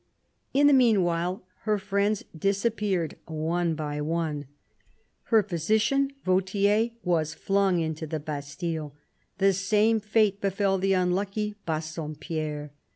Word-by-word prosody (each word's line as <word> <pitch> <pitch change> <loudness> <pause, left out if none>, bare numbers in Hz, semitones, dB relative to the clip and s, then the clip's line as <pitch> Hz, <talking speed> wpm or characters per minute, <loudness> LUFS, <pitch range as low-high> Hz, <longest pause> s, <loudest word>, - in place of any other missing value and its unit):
In 285 +2 +4
the 290 - +7
meanwhile 185 -8 +2 0.2
her 215 -1 +2
friends 200 +1 0
disappeared 200 -1 0
one 165 +1 -1
by 150 -1 -3
one. 155 -2 -2 0.8
Her 220 -2 +4
physician, 215 - +1 0.2
Vautier, 200 +4 +2
was 160 -3 0
flung 195 -2 +2
into 160 0 -3
the 155 0 -3
Bastille; 150 +1 -5 0.4
the 195 0 +4
same 210 +4 +2
fate 210 -1 +2
befell 195 0 +1
the 195 +1 +2
unlucky 195 +3 0
Bassompierre. 155 -1 -4
185 Hz, 110 wpm, -27 LUFS, 160-205 Hz, 0.8 s, the